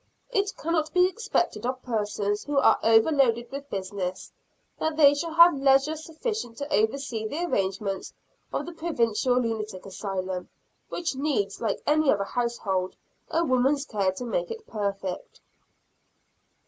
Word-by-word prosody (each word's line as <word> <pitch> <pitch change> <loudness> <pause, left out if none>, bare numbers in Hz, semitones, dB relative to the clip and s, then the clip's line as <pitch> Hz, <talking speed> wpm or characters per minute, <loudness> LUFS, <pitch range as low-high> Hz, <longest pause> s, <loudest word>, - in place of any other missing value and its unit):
It 405 -3 +1
cannot 315 -1 -1
be 360 0 +6
expected 450 +5 -1
of 255 +1 -3
persons 210 -3 -1
who 290 -1 -2
are 275 - +5
over 225 +6 +5
loaded 240 -4 +2
with 280 +1 -7
business, 190 -1 -4 0.5
that 315 -1 -1
they 285 -2 +7
shall 320 +3 -3
have 340 +1 +9
leisure 275 +3 +4
sufficient 320 - -5
to 285 +1 -4
oversee 220 0 0
the 320 +9 -2
arrangements 195 - -2 0.4
of 285 - -2
the 345 - -6
Provincial 250 -7 +1
Lunatic 215 -5 -3
Asylum, 190 -2 -4 0.4
which 345 -3 -2
needs, 265 -9 -1
like 220 -4 -1
any 305 -1 +4
other 200 -1 +1
household, 195 -5 -2 0.3
a 335 - +1
woman's 270 +2 +2
care 200 -8 0
to 245 +6 -6
make - - -1
it 455 -1 -7
perfect. 200 -3 -4
250 Hz, 145 wpm, -26 LUFS, 205-310 Hz, 0.5 s, have